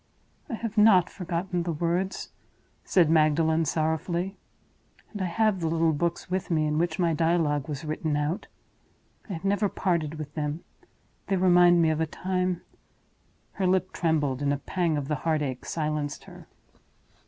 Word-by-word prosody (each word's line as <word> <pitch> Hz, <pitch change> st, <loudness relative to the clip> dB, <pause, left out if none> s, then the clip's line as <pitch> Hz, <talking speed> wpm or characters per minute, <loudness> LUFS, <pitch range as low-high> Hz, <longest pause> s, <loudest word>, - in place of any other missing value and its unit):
'" -, -, -37 dB
"I 240 Hz, -, -2 dB
have 225 Hz, -1 st, -2 dB
not 195 Hz, -5 st, +6 dB
forgotten 180 Hz, 0 st, -3 dB
the 170 Hz, 0 st, -2 dB
words," 175 Hz, +4 st, -2 dB, 0.5 s
said 175 Hz, -4 st, +3 dB
Magdalen, 160 Hz, +1 st, +3 dB
sorrowfully; 165 Hz, +5 st, -1 dB, 0.8 s
"and 205 Hz, -, -5 dB
I -, -, 0 dB
have 210 Hz, +2 st, +1 dB
the 165 Hz, -, -1 dB
little 165 Hz, 0 st, +2 dB
books 170 Hz, +3 st, -2 dB
with 185 Hz, 0 st, -2 dB
me 155 Hz, -3 st, +2 dB
in 150 Hz, 0 st, 0 dB
which 170 Hz, -1 st, 0 dB
my 170 Hz, -2 st, +2 dB
dialogue 160 Hz, -3 st, +1 dB
was 150 Hz, +1 st, -5 dB
written 155 Hz, 0 st, -2 dB
out. 150 Hz, +7 st, -2 dB, 0.8 s
I -, -, -3 dB
have 170 Hz, +2 st, -6 dB
never 200 Hz, +1 st, +2 dB
parted 170 Hz, -6 st, -1 dB
with 150 Hz, -1 st, -7 dB
them; 150 Hz, +1 st, -3 dB, 0.6 s
they 195 Hz, -, +1 dB
remind 175 Hz, -2 st, +5 dB
me 160 Hz, -, +3 dB
of 155 Hz, 0 st, -1 dB
a 160 Hz, -, +1 dB
time—" 180 Hz, +1 st, -2 dB, 0.9 s
Her 190 Hz, -2 st, -1 dB
lip 185 Hz, 0 st, +1 dB
trembled, 150 Hz, -6 st, 0 dB
and 140 Hz, 0 st, +1 dB
a 145 Hz, -, +1 dB
pang 165 Hz, +2 st, -1 dB
of 140 Hz, -2 st, -3 dB
the 150 Hz, 0 st, -1 dB
heart 155 Hz, 0 st, 0 dB
ache 130 Hz, -3 st, -4 dB
silenced 150 Hz, -2 st, -3 dB
her. -, -, -13 dB
165 Hz, 170 wpm, -27 LUFS, 155-180 Hz, 0.9 s, not